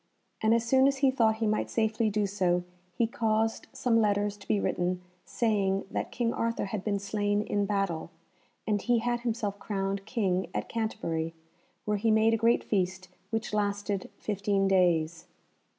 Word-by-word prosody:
And 220 +1 +4
as 230 0 0
soon 265 +3 +5
as 275 0 +1
he 265 - +5
thought 225 -4 +3
he 220 0 -1
might 215 0 0
safely 220 0 +1
do 210 0 +1
so 185 -3 +1 0.3
he 235 - +3
caused 225 -2 0
some 230 -2 +2
letters 205 -1 +1
to 200 - -15
be 105 -2 +2
written 180 - -1 0.2
saying 200 -4 0
that - - -3
King 235 -1 0
Arthur 230 -1 -1
had 200 -1 -4
been 205 -2 0
slain 205 +1 0
in 205 -1 0
battle, 195 -6 -1 0.6
and 205 -2 +1
he 245 -1 +2
had 240 +1 0
himself 220 -4 -2
crowned 195 0 -3
King 190 -6 0
at - - -2
Canterbury, 165 -8 -2 0.5
where 210 0 +1
he 225 +3 +1
made 220 +1 +4
a - - +3
great 230 +1 +4
feast 185 -2 -1 0.2
which 225 -1 -3
lasted 205 -1 -1
fifteen 200 -1 0
days. 170 -3 +2
205 Hz, 170 wpm, -29 LUFS, 195-225 Hz, 0.6 s, soon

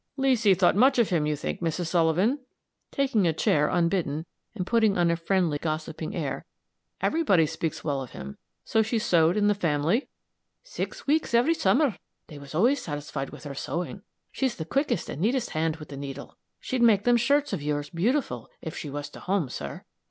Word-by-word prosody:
"Leesy 245 -7 +4
thought 180 0 +3
much 260 +6 +5
of 235 -3 +3
him, 155 -4 +2
you 150 - 0
think, 150 - -4
Mrs. 170 +1 -1
Sullivan," 175 - +2 0.5
taking 260 - +1
a 160 - +2
chair 150 -1 +2
unbidden, 170 -3 0 0.3
and 185 -4 -3
putting 220 -2 +3
on 170 -1 +3
a - - +2
friendly, 170 -3 0
gossiping 155 0 -4
air. - - -3 0.6
"Everybody 200 - +3
speaks 160 +1 -4
well 140 -3 -1
of 130 - -7
him. 70 +1 -9 0.3
So 220 - +2
she 220 +2 0
sewed 175 -5 +3
in 205 - +2
the 205 - +4
family?" 170 - 0 0.6
"Six - - -6
weeks 300 -4 +1
every 250 +8 +4
summer. 250 - +2 0.3
They 150 -3 -11
was 140 +2 -10
always 245 - +3
satisfied 145 -2 -5
with - - -11
her 145 -2 -6
sewing 175 +7 -4 0.3
she's 265 -3 -1
the 160 - -5
quickest 275 - 0
and 150 - -6
neatest 235 +4 +1
hand 160 0 0
with 155 -2 -11
the 140 - -7
needle! 140 0 -7 0.2
She'd 255 -1 -2
make 215 -4 +5
them 245 +1 +4
shirts 280 +3 +2
of 180 - -2
yours 145 0 -2
beautiful, 175 - -1
if 160 - -7
she 150 - -5
was 145 +1 -5
to - - -11
home, 185 -7 -1
sir." 70 - -6
175 Hz, 190 wpm, -27 LUFS, 150-235 Hz, 0.6 s, much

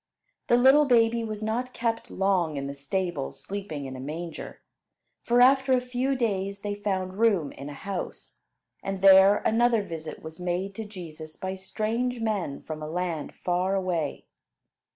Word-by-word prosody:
The 240 - +5
little 265 +4 +6
baby 230 -2 +3
was 215 -1 -4
not 245 +4 -2
kept 230 -1 -1
long 185 -6 +1
in 140 - -3
the 140 - -4
stable 145 +1 -2
sleeping 195 -8 -6
in 130 0 -6
a - - -7
manger; 160 +5 -6 0.6
for 240 +1 +3
after 265 +1 +5
a 255 - +5
few 250 +2 -1
days 200 -5 -1
they 205 0 -2
found 195 -2 -3
room 200 -10 +3
in 140 - -8
a 145 - -8
house; 195 +3 -6 0.4
and 195 -1 -4
there 195 +1 +7
another 230 -1 +3
visit 160 -4 -7
was 160 +1 -8
made 180 +2 -2
to 220 +2 -6
Jesus 160 -6 -9
by 190 0 -3
strange 225 +6 -2
men 205 -10 -2
from 155 -1 -6
a 155 - -5
land 170 -3 -3
far 180 +2 0
away. 175 -6 -2
195 Hz, 165 wpm, -27 LUFS, 170-225 Hz, 0.6 s, there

